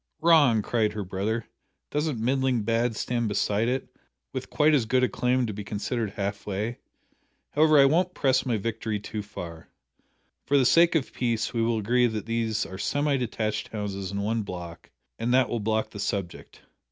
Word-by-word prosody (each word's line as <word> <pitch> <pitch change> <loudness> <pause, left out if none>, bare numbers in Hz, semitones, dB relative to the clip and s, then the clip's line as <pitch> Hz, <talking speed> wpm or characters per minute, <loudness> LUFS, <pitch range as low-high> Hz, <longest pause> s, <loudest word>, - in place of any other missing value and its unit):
"Wrong!" 145 -10 +5
cried 110 -2 0
her 105 -1 -3
brother, 100 +5 -2 0.4
"doesn't 150 -4 -1
middling 130 0 +1
bad 115 +1 +1
stand 120 +1 -1
beside 105 +1 0
it, 130 +2 -1 0.5
with - - -5
quite 155 +1 +3
as 130 -7 +2
good 130 +2 +2
a - - +5
claim 125 0 +1
to 110 - -4
be 105 +1 -6
considered 105 +1 -3
half 100 0 -4
way? 105 +4 -3 0.7
However, 155 0 +5
I 140 - +8
won't 180 +6 +2
press 130 -1 +2
my 120 -4 0
victory 110 0 -3
too 105 +1 -5
far. 85 -5 -9 0.7
For 140 - +2
the 130 - +4
sake 170 +6 +5
of 150 -5 0
peace 115 -3 -1
we 115 - 0
will 115 0 +1
agree 120 +4 +2
that 110 -3 -4
these 115 -1 -1
are 95 0 -8
semi 145 +4 +1
detached 110 -2 -2
houses 100 -4 -4
in 100 0 -2
one 110 +2 0
block 90 -4 -8 0.3
and 115 +2 0
that 130 -2 +3
will 120 - -1
block 110 +1 -1
the 105 - -8
subject. 100 -3 -4
115 Hz, 185 wpm, -26 LUFS, 105-130 Hz, 0.7 s, I